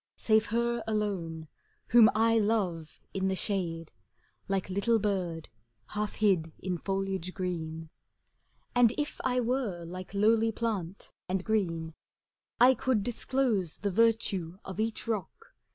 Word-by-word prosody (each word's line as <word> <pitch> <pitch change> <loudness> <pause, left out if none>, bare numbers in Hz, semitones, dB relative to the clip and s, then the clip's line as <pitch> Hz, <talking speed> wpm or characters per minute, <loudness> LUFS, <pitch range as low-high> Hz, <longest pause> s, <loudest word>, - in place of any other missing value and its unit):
Save 220 0 +3
her 235 +1 0
alone, 185 -7 -2 0.4
whom 230 -2 +8
I 225 +1 +4
love 190 -7 -1
in 190 0 0
the 190 - 0
shade. 170 -5 -1 0.6
Like 195 -1 -1
little 200 +5 +2
bird 185 -6 -2 0.4
half 210 0 -3
hid 185 -7 +2
in 180 -2 -3
foliage 195 -1 -2
green. 165 -3 -4 0.8
And 245 -2 +5
if 295 -1 -3
I 250 -1 +1
were 235 -8 -1
like 185 +3 -8
lowly 225 +2 +4
plant 205 -5 -3 0.2
and 185 0 -1
green, 165 -7 -1 0.7
I 250 +2 +8
could 245 -3 0
disclose 240 - 0
the 200 - -2
virtue 195 -5 +1
of 190 +2 -7
each 225 +1 -2
rock. 215 -6 -4
200 Hz, 130 wpm, -30 LUFS, 180-225 Hz, 0.8 s, whom